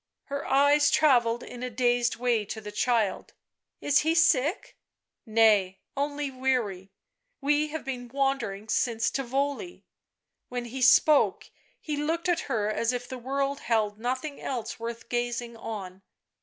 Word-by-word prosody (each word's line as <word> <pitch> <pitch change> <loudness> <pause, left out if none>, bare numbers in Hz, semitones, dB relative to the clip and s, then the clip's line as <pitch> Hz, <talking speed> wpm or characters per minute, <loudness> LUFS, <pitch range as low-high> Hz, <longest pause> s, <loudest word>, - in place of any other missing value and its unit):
Her 280 0 -5
eyes 285 +2 +4
travelled 240 -6 +3
in 245 - -9
a 250 - -3
dazed 240 0 +1
way 240 -3 +1
to 220 - -6
the 210 -1 -8
clrild. 225 -1 0 0.2
" - - -56
Is 280 -1 +5
he 320 +1 +1
sick 320 0 +2 0.2
?" - - -60
" - - -60 0.2
Nay, 200 -4 +4 0.2
only 285 0 -2
weary; 245 -8 -1 0.5
we 295 +2 +2
have 310 -1 -6
been 250 -2 -5
wandering 245 -6 -1
since 225 0 0
Tivoli 280 +7 -3 0.3
" - - -58
While 245 -1 -3
he 245 +2 -6
spoke 275 +3 +4 0.3
he 300 -2 -4
looked 325 +4 -1
at 350 -2 +2
her, 215 -5 0
as 230 +2 0
if 245 0 -4
the 260 0 -7
world 275 +2 -2
held 215 -3 0
nothing 255 +5 -3
else 245 -4 -4
worth 230 0 -6
gazing 240 -1 -2
on. 195 -5 -7
250 Hz, 155 wpm, -27 LUFS, 230-280 Hz, 0.5 s, Is